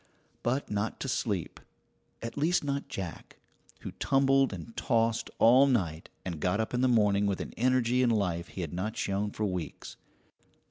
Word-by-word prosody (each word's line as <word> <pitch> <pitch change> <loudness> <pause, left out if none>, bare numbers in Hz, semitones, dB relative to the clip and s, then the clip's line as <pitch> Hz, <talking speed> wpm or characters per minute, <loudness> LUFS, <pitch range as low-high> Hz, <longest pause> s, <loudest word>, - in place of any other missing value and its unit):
But 130 +1 -1
not 105 +1 -2
to - - -2
sleep 100 - -2 0.6
at 115 - -5
least 160 +4 +2
not 140 0 -2
Jack, 95 -10 -7 0.4
who - - -6
tumbled 135 -1 +3
and 95 +4 -8
tossed 115 -2 +1
all 130 +4 +6
night 85 - 0 0.2
and 85 -4 -4
got 90 +6 0
up 110 - -2
in 125 - +1
the 130 - +4
morning 105 -4 +3
with 100 -2 -1
an - - -6
energy 125 0 +2
and 125 -2 +3
life 90 -5 0
he 95 - -7
had 80 -2 -4
not 95 +5 -3
shown 100 +1 -1
for 105 +1 -3
weeks. 90 -4 -5
110 Hz, 175 wpm, -29 LUFS, 95-130 Hz, 0.6 s, all